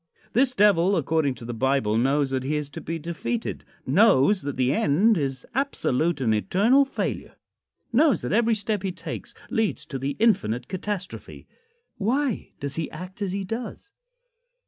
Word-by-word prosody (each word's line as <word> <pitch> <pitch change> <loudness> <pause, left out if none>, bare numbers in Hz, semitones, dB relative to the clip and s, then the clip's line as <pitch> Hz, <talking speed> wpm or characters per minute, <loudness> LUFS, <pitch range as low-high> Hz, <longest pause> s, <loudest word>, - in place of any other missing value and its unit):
This 255 +2 +3
Devil, 200 -3 +4
according 155 -3 +1
to 115 - -10
the 120 - -4
Bible, 130 -3 +1
knows 135 +4 +2
that 130 -1 0
he 140 +4 -2
is 150 -1 -3
to - - -7
be 165 +1 -4
defeated; 170 +8 -4 0.2
knows 185 - +4
that 140 -2 -5
the 130 +1 +2
end 180 +10 +3
is 135 -6 -2
absolute 175 - 0
and 115 -4 +2
eternal 215 - +3
failure; 270 - -4 0.6
knows 290 +4 +4
that - - -2
every 230 +1 +3
step 210 -1 -1
he 190 -1 -2
takes - - -7 0.2
leads 225 -2 0
to 135 - -5
the 135 +2 -2
infinite 150 - +1
catastrophe. 190 0 -5 0.5
Why 255 +3 0
does 140 0 -4
he 160 - -2
act 185 +3 -9
as 195 -2 -1
he 200 0 -2
does? 225 - -6
175 Hz, 165 wpm, -25 LUFS, 135-220 Hz, 0.6 s, Devil